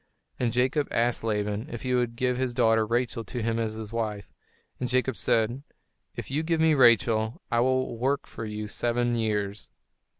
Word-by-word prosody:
And 120 Hz, -2 st, +1 dB
Jacob 130 Hz, +5 st, +1 dB
asked 120 Hz, 0 st, 0 dB
Laban 105 Hz, +3 st, -2 dB
if 120 Hz, -, -6 dB
he 125 Hz, -1 st, -1 dB
would 120 Hz, -2 st, 0 dB
give 125 Hz, +1 st, 0 dB
his 125 Hz, -1 st, -2 dB
daughter, 115 Hz, -3 st, +3 dB
Rachel, 120 Hz, 0 st, -1 dB
to 120 Hz, +2 st, -4 dB
him 115 Hz, 0 st, 0 dB
as 110 Hz, -1 st, -1 dB
his 110 Hz, 0 st, -7 dB
wife; 105 Hz, -4 st, -3 dB, 0.5 s
and 125 Hz, -, -2 dB
Jacob 130 Hz, +1 st, +1 dB
said, 115 Hz, +3 st, +1 dB, 0.5 s
"If -, -, -7 dB
you 145 Hz, +3 st, +1 dB
give 165 Hz, 0 st, 0 dB
me 160 Hz, 0 st, +4 dB
Rachel, 115 Hz, -3 st, +4 dB
I 120 Hz, -, +2 dB
will 130 Hz, 0 st, +1 dB
work 135 Hz, +3 st, 0 dB
for -, -, -8 dB
you 105 Hz, -1 st, -4 dB
seven 120 Hz, +2 st, 0 dB
years." 105 Hz, -3 st, -2 dB
120 Hz, 180 wpm, -27 LUFS, 110-125 Hz, 0.5 s, me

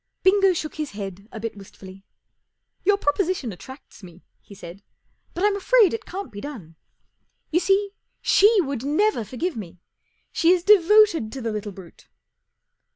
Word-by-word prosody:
Bingo 390 Hz, 0 st, +4 dB
shook 315 Hz, -2 st, -5 dB
his 305 Hz, -5 st, -5 dB
head 200 Hz, 0 st, -8 dB
a 220 Hz, -, -8 dB
bit 225 Hz, 0 st, -5 dB
wistfully. 195 Hz, -1 st, -13 dB, 0.8 s
44 -, -, -47 dB
Your 405 Hz, +1 st, +4 dB
proposition 325 Hz, -, -1 dB
attracts 260 Hz, +9 st, -13 dB
me," 180 Hz, -1 st, -14 dB, 0.2 s
he 200 Hz, -, -15 dB
said, 170 Hz, -1 st, -10 dB
4 -, -, -40 dB, 0.5 s
but 360 Hz, -, 0 dB
I'm 415 Hz, -1 st, +2 dB
afraid 425 Hz, 0 st, +3 dB
it 450 Hz, -2 st, -6 dB
can't 390 Hz, +2 st, -7 dB
be 205 Hz, -, -9 dB
done. 215 Hz, -, -9 dB, 0.8 s
You 335 Hz, -, +3 dB
see. 390 Hz, +2 st, +1 dB, 0.3 s
She 410 Hz, -, +4 dB
would 275 Hz, -6 st, -4 dB
never 305 Hz, -, +1 dB
forgive 275 Hz, -, -4 dB
me. 180 Hz, -5 st, -9 dB, 0.5 s
She 335 Hz, -, +1 dB
is 355 Hz, -2 st, -1 dB
devoted 405 Hz, -, +4 dB
to 270 Hz, -, -6 dB
the 230 Hz, -1 st, -3 dB
little 210 Hz, -1 st, -5 dB
brute." 185 Hz, -3 st, -15 dB
290 Hz, 165 wpm, -23 LUFS, -, 0.8 s, Bingo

